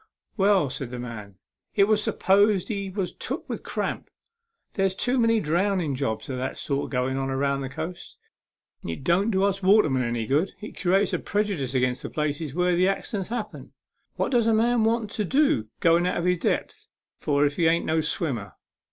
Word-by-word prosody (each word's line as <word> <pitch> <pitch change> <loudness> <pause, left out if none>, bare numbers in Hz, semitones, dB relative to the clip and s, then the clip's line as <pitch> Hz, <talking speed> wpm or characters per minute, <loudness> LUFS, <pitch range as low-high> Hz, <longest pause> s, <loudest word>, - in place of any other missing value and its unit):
" - - -65
Well," 195 - +3
said 135 -2 -5
the 125 - -6
man, 110 -5 -7 0.2
" - - -66 0.2
it 200 - +5
was 210 +1 +3
supposed 200 0 +2
he 200 -3 -3
was 190 -1 -3
took - - -5
with - - -4
cramp. - - -4 0.6
There's 195 -2 0
too 250 +5 0
many 230 -1 +3
drownding 175 -2 0
jobs 120 -5 -3
of 130 - -4
that 130 - -3
sort 140 -1 -2
going 130 0 -1
on 135 0 -2
along 140 +1 0
the 135 - -4
coast. 160 +5 -7 0.7
It 85 +10 -5
don't 180 +8 +2
do 190 -3 +1
us 195 -1 +1
watermen 185 -9 +4
any 120 -2 -1
good. 150 - +1
It 215 - -9
creates 195 +2 +2
a - - +1
prejudice 195 - -2
agin 125 -1 +2
the - - -6
places 150 -1 -3
where 180 0 +2
the 180 +2 +3
accidents 195 0 -2
happen. 235 -2 -6 0.4
What - - -1
does 235 -3 +3
a 225 - +4
man 230 0 +3
want 225 -2 0
to 215 - +1
go 165 0 +4
out 180 +1 0
of 170 - -2
his 180 -1 +2
depth - - -2 0.3
for 145 0 +2
if 145 0 -1
he 170 -2 +3
ain't 165 +1 +2
no 160 0 +1
swimmer 135 - -2
175 Hz, 195 wpm, -25 LUFS, 135-200 Hz, 0.7 s, it